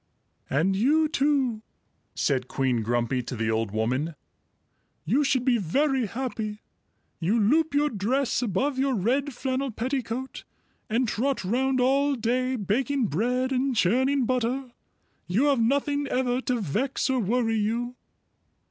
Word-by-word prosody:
"And 165 +8 +1
you 300 +10 +3
too," 275 -7 +1 0.5
said 130 -3 0
Queen 130 -4 0
Grumpy 120 +3 0
to 125 +1 -6
the 110 -1 -1
old 110 -1 0
woman, 125 +10 -1 0.9
"you 250 - +2
should 265 -3 +1
be 245 -3 +3
very 265 - +1
happy. 220 -3 -4 0.6
You 195 +8 +1
loop 290 +8 +2
your 295 0 +2
dress 245 +7 0
above 255 +5 0
your 270 -1 +1
red 260 +8 0
flannel 265 +2 -2
petticoat 255 +2 -4 0.5
and 235 +3 +1
trot 255 +2 -1
round 260 +6 +1
all 275 +3 +3
day, 255 +2 0
baking 240 +3 0
bread 250 - 0
and 260 0 0
churning 260 +7 +2
butter. 255 +1 -1 0.6
You 195 +9 +1
have 270 -4 +2
nothing 285 +4 +1
ever 250 -1 0
to 250 -2 -1
vex 220 - -1
or 260 -1 +1
worry 225 +1 +1
you." 235 +4 -1
245 Hz, 140 wpm, -26 LUFS, 205-270 Hz, 0.9 s, you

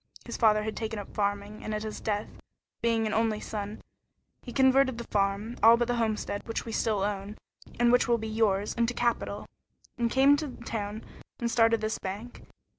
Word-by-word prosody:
His 235 - -5
father 215 -2 +4
had 220 0 -3
taken 220 -1 -3
up 205 - -8
farming, 205 0 -2
and 215 - -3
at 210 - -3
his 215 -1 -6
death, 210 -1 -1 0.5
being 230 -1 +2
an 215 - -1
only 225 -1 +1
son, 210 0 -5 0.6
he 245 - -9
converted 265 -1 +4
the 235 - -5
farm, 200 +2 -1
all 230 +2 +8
but 240 0 0
the 245 -1 0
homestead, 215 -2 -1
which 225 - -3
we 230 - -5
still 215 -3 0
own, 205 +1 -3 0.4
and 240 0 +5
which 245 - +4
will 235 -1 +3
be 220 0 -5
yours, 215 -2 +1
into 235 +1 0
capital, 240 -1 -1 0.5
and 235 -1 +2
came 270 +3 +5
to 290 -4 -5
town 210 0 -4 0.4
and 235 -1 -1
started 225 -1 +4
this 215 0 -2
bank. 205 +6 -6
220 Hz, 190 wpm, -28 LUFS, 210-235 Hz, 0.6 s, all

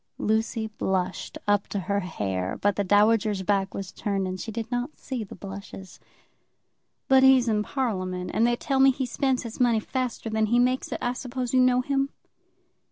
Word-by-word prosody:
Lucy 220 +1 0
blushed 190 -4 -2
up 205 -1 +2
to 200 - -3
her 200 +3 0
hair, 95 - -3
but 205 -1 +2
the 205 - 0
dowager's 205 0 +3
back 195 0 0
was 195 -2 -5
turned, 200 -2 -2
and 185 0 -4
she 225 - -5
did 225 +1 -5
not 245 +5 -3
see 255 -5 -4
the 200 - -10
blushes. 195 -1 -9 1.1
"But 265 0 +6
he's 265 -2 +6
in 215 -2 +2
Parliament, 185 -8 -2
and 230 +2 +3
they 240 - +2
tell 270 +2 -1
me 270 0 +7
he 260 0 0
spends 260 +1 0
his 230 -1 -8
money 240 -3 +3
faster 250 0 -3
than 220 0 +1
he 235 +3 +2
makes 250 +1 +1
it. - - -1
I 245 0 0
suppose 250 -1 -4
you 260 - +5
know 255 0 +4
him?" 275 +1 0
220 Hz, 190 wpm, -26 LUFS, 195-250 Hz, 1.1 s, me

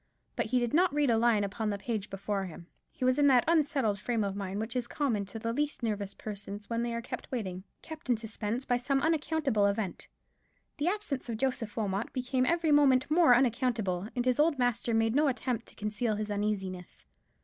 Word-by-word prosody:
But - - -1
he 250 +3 +1
did 240 -1 -1
not 360 +4 +4
read 290 -3 +2
a 225 - +3
line 230 -3 +3
upon 210 +2 -2
the 200 - -1
page 210 -1 -3
before 195 0 -2
him. 170 -1 -9 0.3
He 255 - -3
was 255 +2 +3
in 290 - +5
that 255 -3 +6
unsettled 280 -10 +2
frame 230 0 0
of 200 -1 -2
mind 200 0 -4
which 225 +3 -4
is 245 -1 -1
common 230 -9 -1
to 210 - -7
the 230 +1 -2
least 295 0 -2
nervous 205 -3 -2
persons 205 -1 -7
when 230 0 0
they 235 0 -1
are 235 - -4
kept - - -7
waiting, 190 -7 -3 0.2
kept 315 -5 -9
in 240 - +3
suspense 220 +3 -3
by 245 - +2
some 270 +2 0
unaccountable 305 -8 +2
event. 200 -2 -2 0.7
The 290 - -1
absence 360 - -2
of 225 - -2
Joseph 235 -4 -2
Wilmot 205 -1 -1
became 255 0 0
every 335 -2 +2
moment 285 -2 +4
more 320 -6 +6
unaccountable: 235 -7 +1
and 245 -1 0
his 255 +1 +2
old 305 -1 +3
master 245 -2 0
made 225 0 +2
no 295 +3 +3
attempt 250 -3 -2
to - - -14
conceal 210 +1 -1
his 210 0 -3
uneasiness. 195 -3 -3
235 Hz, 210 wpm, -30 LUFS, 210-265 Hz, 0.7 s, that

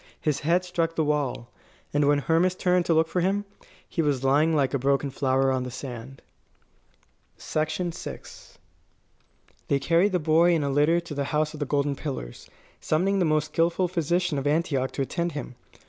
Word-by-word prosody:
His 150 -3 0
head 175 +4 +1
struck 165 -2 -1
the 160 - +1
wall. 145 -5 -2 0.4
And 145 -1 +2
when 145 0 +4
Hermas 165 +5 +2
turned 180 -1 +1
to 165 - +3
look 160 0 +3
for 180 - -1
him, 200 +3 0 0.4
he 170 - -1
was 145 -4 0
lying 150 +4 +3
like 140 -2 +1
a 140 - +1
broken 140 +1 +1
flower 135 0 +1
on 130 -1 0
the 125 - -4
sand. 130 0 -8 1.1
VI 155 0 -1 2.0
They 140 - +2
carried 170 +7 +2
the - - +3
boy 165 +2 +3
in 155 - 0
a 140 - -1
litter 150 +5 +3
to 170 -3 -8
the 140 -1 -2
House 150 +1 0
of 155 - -9
the 145 - -2
Golden 140 0 0
Pillars, 135 - -7 0.3
summoning 190 +5 +1
the 180 - +2
most 155 -1 0
skilful 170 +2 +2
physician 175 -2 0
of 135 - -2
Antioch 145 -4 +1
to 135 - -1
attend 170 +5 -2
him. 145 -3 -6
150 Hz, 180 wpm, -26 LUFS, 140-170 Hz, 2.0 s, when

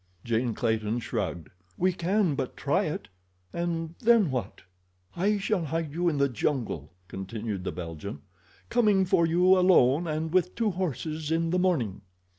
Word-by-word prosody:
Jane 115 0 0
Clayton 110 -1 0
shrugged. 100 -9 -3 0.3
"We 185 +1 +2
can 185 0 +1
but 135 -2 -4
try - - +1
it—and 95 - -5
then 225 - +4
what?" 120 -6 -4 0.5
"I 205 +4 +2
shall 195 -3 0
hide 160 0 -3
you 175 +2 +1
in 150 - -2
the 140 0 +3
jungle," 120 - -2 0.2
continued 100 +1 -5
the - - -2
Belgian, 85 +3 -7 0.5
"coming 210 -5 +3
for 170 -2 +3
you 180 +3 +5
alone 170 -4 +4
and 160 +1 -2
with 180 -1 +2
two 225 -3 +1
horses 160 -3 -3
in 165 0 +1
the 180 - +2
morning." 145 - 0
160 Hz, 150 wpm, -28 LUFS, 115-180 Hz, 0.5 s, you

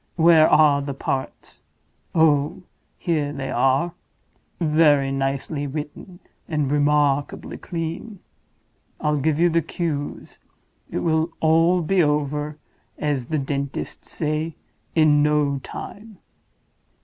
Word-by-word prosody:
Where 165 -2 +6
are 150 -2 +5
the 140 -1 -5
parts? 135 -1 -4 0.5
Oh, 155 0 +2 0.3
here 150 -4 -1
they 135 -2 -5
are! 135 +7 +2 0.7
Very 150 -4 +3
nicely 135 +2 -2
written, 150 +5 -7 0.3
and 150 -4 0
remarkably 145 -1 +1
clean. 170 +6 -5 0.8
I'll 150 -1 0
give 155 +2 +1
you 175 0 +4
the 165 +1 +3
cues—it 155 -3 -4 0.6
will 160 0 +1
all 165 +3 +3
be 190 +3 +2
over 150 0 0 0.4
(as 145 -5 -1
the 155 - -1
dentists 140 0 -4
say) 155 +1 -2 0.4
in 155 -2 +5
no 150 -2 +2
time. 210 +9 -9
150 Hz, 105 wpm, -23 LUFS, 140-160 Hz, 0.8 s, Where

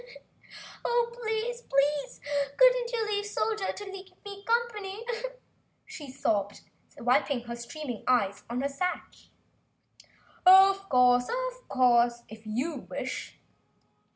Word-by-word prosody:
"Oh, 475 0 +1
please, 470 +1 -3
please 280 - 0 0.4
couldn't - - +5
you 455 -2 -1
leave 410 0 +1
the 415 - -6
Soldier 430 -2 -1
to 410 - -8
keep 380 0 -12
me 400 0 -9
company?" 455 -3 -1 0.8
she 290 -3 -9
sobbed, 205 -7 -1 0.4
wiping 245 +2 +1
her 235 0 -6
streaming 240 0 -7
eyes 205 -6 +2
on 245 +2 -2
her 280 - +1
sash. 360 +6 -4 1.1
"Of 385 +1 +7
course, 250 -1 +4 1.0
if 220 +1 -11
you 255 +10 -2
wish!" - - -5
365 Hz, 110 wpm, -28 LUFS, -, 1.1 s, Of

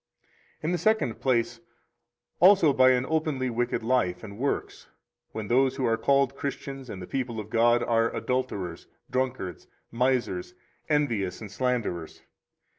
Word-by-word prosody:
In 160 - 0
the 175 - 0
second 215 - +1
place, 120 -2 +1 0.8
also 180 -5 +6
by 130 0 +6
an 130 0 +2
openly 155 -5 0
wicked 120 -1 -1
life 115 -7 +1
and 105 0 -9
works, 140 +2 -3 0.4
when 110 -2 -5
those 130 +3 +3
who 135 -2 -1
are 115 - +3
called 140 +2 +2
Christians 135 -2 -5
and 95 - -6
the 90 - -7
people 120 -2 -3
of 105 0 -8
God 120 +1 +4
are 115 0 +2
adulterers, 105 -10 -3 0.2
drunkards, 130 -9 -2 0.2
misers, 125 - 0 0.3
envious, 115 - 0
and 105 -3 -9
slanderers. 110 -9 -2
125 Hz, 140 wpm, -27 LUFS, 115-135 Hz, 0.8 s, also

